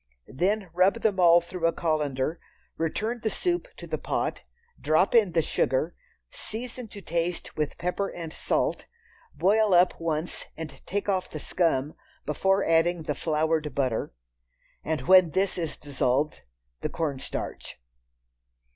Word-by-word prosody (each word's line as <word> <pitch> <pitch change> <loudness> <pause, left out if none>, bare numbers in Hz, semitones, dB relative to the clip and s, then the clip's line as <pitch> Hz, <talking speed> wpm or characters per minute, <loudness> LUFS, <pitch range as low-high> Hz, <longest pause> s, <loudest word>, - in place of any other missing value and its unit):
Then 190 +5 -1
rub 190 +6 +3
them 205 -4 +1
all 175 -1 +7
through 170 0 -1
a - - +3
colander, 155 -2 -1 0.4
return 215 +9 -2
the 220 - 0
soup 355 - -1
to - - -8
the - - -3
pot, - - -2 0.4
drop 155 +5 +3
in 210 -7 +5
the 165 -1 +3
sugar, 150 +5 0 0.4
season 245 +2 -6
to 200 -1 -10
taste 170 +1 -2
with 150 -1 -2
pepper 180 +3 -1
and 165 -2 -7
salt, - - -1 0.5
boil 200 +5 +4
up 180 +1 +5
once 160 0 -2
and 150 -4 -7
take 205 +2 -2
off 190 -2 0
the - - -6
scum 150 -3 0 0.3
before 195 +6 +2
adding 165 +1 +3
the 150 - -1
floured 155 0 0
butter, 130 -5 0 0.7
and 160 -1 -1
when 185 -1 +6
this 190 +4 0
is 165 -3 -3
dissolved, 140 - 0 0.4
the - - -2
cornstarch. 145 - -4
170 Hz, 140 wpm, -27 LUFS, 155-190 Hz, 0.7 s, all